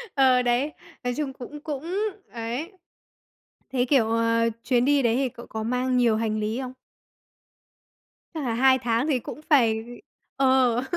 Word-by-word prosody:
Ờ, 260 -2 +5
đấy, 245 +5 +1 0.3
nói 245 0 -1
chung 290 -3 -2
cũng 275 +4 -9
cũng, 295 -1 -5 0.5
ấy. 240 - -5 1.0
Thế, 250 -1 0
kiểu, 240 -5 +3
ờ, 230 0 +2
chuyến 245 -2 +2
đi 285 0 +3
đấy 235 -1 +2
thì 265 -1 +1
cậu 235 - -12
có 220 0 -5
mang 250 +2 0
nhiều 235 -3 +3
hành 215 -1 -1
lý 215 +4 -2
không? 255 0 -6 1.6
Chắc 305 -3 -3
là 230 -2 -1
2 260 +2 +4
tháng 235 +3 0
thì 265 -4 +2
cũng 295 - -8
phải 230 -6 +4 0.6
ờ. 260 -2 +3
250 Hz, 160 wpm, -25 LUFS, 230-270 Hz, 1.6 s, Ờ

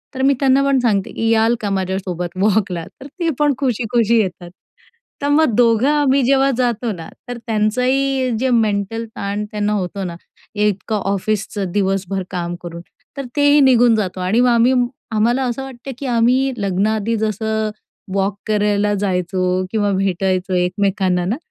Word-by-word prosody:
तर 260 - -3
मी 275 +1 +4
त्यांना 270 0 +3
पण 275 -1 +3
सांगते, 205 -5 0
की 225 - -2
याल 225 +1 +3
का 205 - -2
माझ्यासोबत 190 -2 -2
वॉकला? 195 -4 +1 0.2
तर 275 - -9
ते 335 -2 +1
पण 295 -1 +3
खुशी-खुशी 235 -3 +1
येतात. 180 -3 -5 0.7
तर 285 - -1
मग 295 -4 +3
दोघं 235 +1 +3
आम्ही 285 -2 +3
जेव्हा 270 +1 +3
जातो 240 -2 0
ना, 165 -3 -9 0.2
तर 245 - -4
त्यांचंही 255 +4 +1
जे 260 +1 +1
मेंटल 225 -1 0
ताण 200 +1 -3
त्यांना 210 0 -1
होतो 195 0 -3
ना, 175 -2 -5 0.4
एकतर 210 +1 0
ऑफिसचं 200 -1 -2
दिवसभर 195 -1 -1
काम 175 -1 -3
करून, 170 0 -7 0.4
तर 275 - -4
तेही 290 0 +5
निघून 245 -3 +5
जातो. 195 -4 -2
आणि 185 +6 +1
मग 250 - +4
आम्ही 240 +2 +4 0.4
आम्हाला 240 +5 +2
असं 250 +1 -2
वाटतं, 265 0 -8
की 280 - -5
आम्ही 250 +3 +2
लग्नाआधी 210 +3 0
जसं 220 0 -1 0.5
वॉक 200 +1 0
करायला 210 -1 +1
जायचो 185 -1 -1
किंवा 205 -2 +1
भेटायचो 190 0 0
एकमेकांना 185 0 0
ना. 220 +9 -1
215 Hz, 155 wpm, -19 LUFS, 195-245 Hz, 0.7 s, तेही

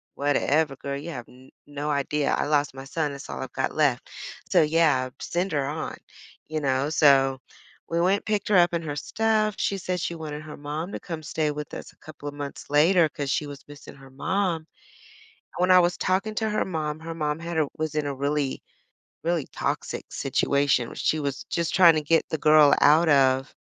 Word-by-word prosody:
"Whatever, 145 +1 +1
girl, 140 0 -4
you 165 +4 -7
have 120 -4 -8
n 130 +1 -17 0.2
no 145 +1 -5
idea, 145 +1 0
I - - 0
lost 145 -2 +1
my 135 0 -8
son. 150 +1 -2
That's 140 - -9
all 65 -1 -5
I've - - -7
got - - -1
left. - - +1 0.4
So, - - +5
yeah, 150 -5 +2
send 180 +2 -2
her 140 -2 0
on." 155 +3 -4 0.5
You 155 0 -2
know? 135 +1 0
So 135 -3 +4 0.5
we 170 0 0
went 195 +3 +2
picked 210 -2 -1
her 205 - +3
up 175 0 +5
and 170 -1 -1
her 145 -2 -4
stuff. 215 +5 0
She 200 - -1
said 180 0 -2
she 170 - -2
wanted 155 -2 -6
her 155 - -9
mom 150 +6 -5
to - - -4
come 165 -3 -7
stay 155 -1 -1
with 150 0 -7
us - - -8
a - - -32
couple 145 -1 -11
of - - -10
months 145 -1 -7
later 160 +3 +4
'cause 140 -1 -5
she 150 - -1
was 145 0 -10
missing 145 -1 -12
her 135 -1 -15
mom. 185 +5 0
And 155 - -25 0.9
when 180 +1 +3
I 185 - +8
was 175 0 +2
talking 195 +4 0
to 220 0 0
her 215 - 0
mom, 155 -3 -3
her 165 0 -6
mom 150 0 -2
had 170 -1 -5
a 155 -3 +2
was 155 -1 -3
in 150 -1 0
a 140 - -3
really, 140 0 -1 0.6
really 170 -3 0
toxic - - -3
situation 140 -4 +1
where - - -11
she 155 - 0
was 140 -2 -4
just 170 -1 -1
trying 170 -4 +7
to 155 - +1
get 165 +2 +2
the 160 - -1
girl 150 -1 +6
out 160 +3 +6
of 135 -1 +3
150 Hz, 215 wpm, -25 LUFS, 140-170 Hz, 0.9 s, I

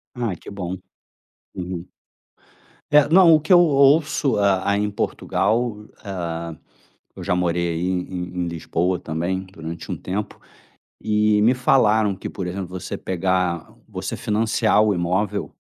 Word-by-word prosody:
Ai 115 -7 -2
que - - -12
bom. 95 -2 -5 0.8
Uhum. 90 -1 -5 1.1
É, 150 -1 +6
não, 170 0 +7
o 155 - +6
que 155 +5 0
eu 175 - +8
ouço 140 -3 +3
a 100 -1 +2
a 100 - +2
em 105 0 0
Portugal, 110 +1 -1 0.2
hã, 85 -4 -5 0.6
eu - - -9
já 90 - 0
morei, 85 -1 0
aí, 85 +2 -2
em 90 -1 -3
em - - -3
Lisboa 85 +2 -1
também 85 +4 -3
durante 80 -2 -7
um - - -2
tempo 100 +3 -5 0.6
e 105 -1 +2
me 120 +4 +5
falaram 110 -4 +3
que, - - -7
por 95 -3 -5
exemplo, 95 0 -4
você 90 -1 -6
pegar 90 -2 -1 0.2
você - - -5
financiar 110 0 +1
o 105 -2 +3
imóvel, 90 +4 -1
95 Hz, 145 wpm, -22 LUFS, 90-110 Hz, 1.1 s, eu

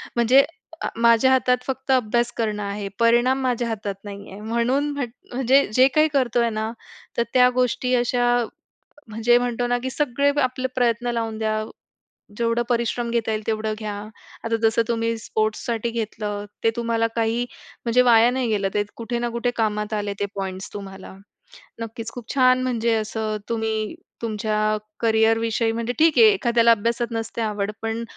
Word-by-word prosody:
म्हणजे 245 +3 +5 0.4
अ, - - -1
माझ्या 235 +2 +4
हातात 250 -1 +3
फक्त 265 0 -3
अभ्यास 240 -1 +2
करणं 215 -2 -1
आहे. 200 0 -4
परिणाम 240 +3 +3
माझ्या 245 -2 0
हातात 210 -3 -3
नाही 200 -1 -9
आहे. 195 - -9
म्हणून 235 +6 0
म्हट 280 -4 -3 0.2
म्हणजे 265 +2 +4
जे 255 +3 +6
काही 305 0 +5
करतोय 240 -3 +2
ना, 220 0 -3 0.5
तर 235 - +3
त्या 250 -1 +6
गोष्टी 250 0 +1
अशा 245 0 +1 0.9
म्हणजे 225 +3 +3
म्हणतो 245 0 -1
ना, 245 0 +1
की 260 - -2
सगळे 280 0 +1
आपले 255 0 -1
प्रयत्न 240 -1 +1
लावून 225 -2 -3
द्या, 215 0 -1 0.7
जेवढं 230 +1 +1
परिश्रम 235 0 0
घेता 230 -1 0
येईल 215 0 -2
तेवढं 215 -1 -1
घ्या. 215 -2 -4 0.5
आता 230 0 0
जसं 225 +1 +3
तुम्ही 230 0 0
स्पोर्ट्ससाठी 220 +1 -2
घेतलं, 210 -2 -4 0.2
ते 225 - +5
तुम्हाला 230 -1 0
काही 230 +1 +1 0.4
म्हणजे 245 +1 +4
वाया 235 -1 +6
नाही 255 -1 -1
गेलं. 205 -3 +1
ते 205 - +1
कुठे 235 +1 -3
ना 240 0 -1
कुठे 235 +1 -1
कामात 210 -1 -1
आले 205 -1 -2
ते 205 - +1
पॉईंट्स 190 -1 -5
तुम्हाला. 195 -2 -8 0.7
नक्कीच. 230 0 -6
खूप 245 -2 -7
छान! 255 -2 +4
म्हणजे 235 -2 0
असं 215 0 -2
तुम्ही 220 -2 -2 0.3
तुमच्या 215 -1 0 0.2
करियर 225 0 +3
विषयी 225 0 0
म्हणजे 230 +1 -2
ठीक 320 -1 +4
आहे 455 - +8
एखाद्याला 235 -9 +3
अभ्यासात 230 +2 +1
नसते 225 0 -4
आवड, 210 -2 -1
पण 225 +1 -2
230 Hz, 165 wpm, -23 LUFS, 220-245 Hz, 0.9 s, आहे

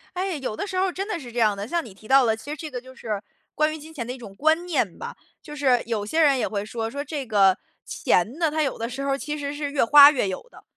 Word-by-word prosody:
哎， 370 0 -2
有 255 -6 -4
的 - - -3
时 380 - -6
候 375 - +3
儿 - - -2
真 390 +2 -4
的 425 -6 -3
是 245 -5 -10
这 240 - -3
样 215 -3 +3
的。 200 +1 -5
像 340 +4 -1
你 215 - -11
提 210 +3 -16
到 270 +1 +6
了， 220 -1 +2
其 225 +6 -11
实 305 - -5
这 310 +1 -6
个 250 -4 -6
就 260 0 -14
是 215 -6 -4 0.3
关 305 +1 +2
于 - - -6
金 315 +1 -12
钱 255 -7 -5
的 245 - -5
一 255 - -7
种 215 -6 -11
观 315 - +2
念 270 - -1
吧。 - - -7 0.3
就 295 -3 -10
是 260 -4 +3
有 220 -3 -2
些 315 +10 +1
人 280 -4 +5
也 - - 0
会 205 -1 -3
说， 225 +1 -4
说 285 +2 -4
这 290 -2 -5
个 195 -4 +4 0.3
钱 215 - 0
呢， 325 -3 +1
它 310 +1 0
有 280 - -1
的 230 +1 -3
时 270 +3 -5
候 275 0 0
其 300 +2 -4
实 285 0 -4
是 290 -1 -4
越 285 - +2
花 285 +4 +9
越 255 -8 0
有 190 - -5
的， - - -16
275 Hz, 330 characters per minute, -24 LUFS, 225-305 Hz, 0.3 s, 花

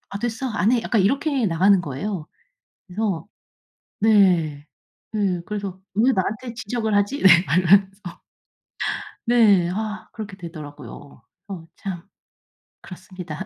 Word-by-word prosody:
아 - - -3
됐어. 240 +3 -3
안 220 -2 +1
해." 245 - +3
약간 220 -4 +2
이렇게 270 - +1
나가는 185 +2 +4
거예요. 160 +3 -5 0.6
그래서 190 -4 -2 0.8
네 180 -9 +3 0.5
네 195 -5 0
그래서 200 -3 -5
"왜 235 +6 +3
나한테 220 +5 -2
지적을 225 -2 -2
하지?" 205 +8 +1
네 190 - +8 0.2
막 165 - +1
이러면서. 195 +2 +4 1.3
네. 210 -7 +4
아 215 +2 -4
그렇게 205 -4 -8
되더라고요. 145 - -10 0.2
어 185 -5 -7
참 185 -4 -6 0.8
그렇습니다. 180 -2 -8
195 Hz, 250 characters per minute, -22 LUFS, 175-220 Hz, 1.3 s, 네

